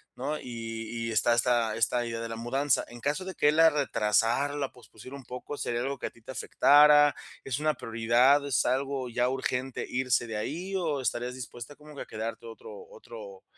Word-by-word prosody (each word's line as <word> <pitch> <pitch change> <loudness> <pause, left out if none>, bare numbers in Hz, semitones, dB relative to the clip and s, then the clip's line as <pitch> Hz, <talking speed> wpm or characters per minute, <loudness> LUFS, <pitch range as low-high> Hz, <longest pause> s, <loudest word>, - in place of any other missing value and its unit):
¿no? 145 +4 -3
Y 115 -1 -5
y - - -3
está 120 +1 +3
está 120 -2 +1
esta 120 +2 +1
idea 115 -1 -4
de 115 0 -5
la 115 - -5
mudanza. 130 +4 0
En 120 - -11
caso 145 +9 -2
de 190 - -5
que 145 - +3
él 150 - +1
la 165 0 +6
retrasara, 125 0 +1
la 140 -2 -3
pospusiera 125 +1 -13
un 135 - -13
poco, 125 +4 -7
¿sería 120 -3 -2
algo 135 +2 -3
que - - -6
a - - -7
ti 115 - -22
te - - -5
afectara? 145 +4 +5 0.3
¿Es 135 0 -3
una 155 0 +1
prioridad, 120 +4 +3
es 140 -5 +1
algo 135 0 -1
ya 120 +1 +1
urgente 130 0 -3
irse 125 -1 0
de 110 - -5
ahí, 175 - -4
o 160 -6 -1
estarías 125 -1 -2
dispuesta 120 +1 -9
como 150 0 -14
que - - -7
a - - -6
quedarte 110 +1 -6
otro 110 -2 -10
otro 110 -5 -11
125 Hz, 210 wpm, -28 LUFS, 115-140 Hz, 0.3 s, la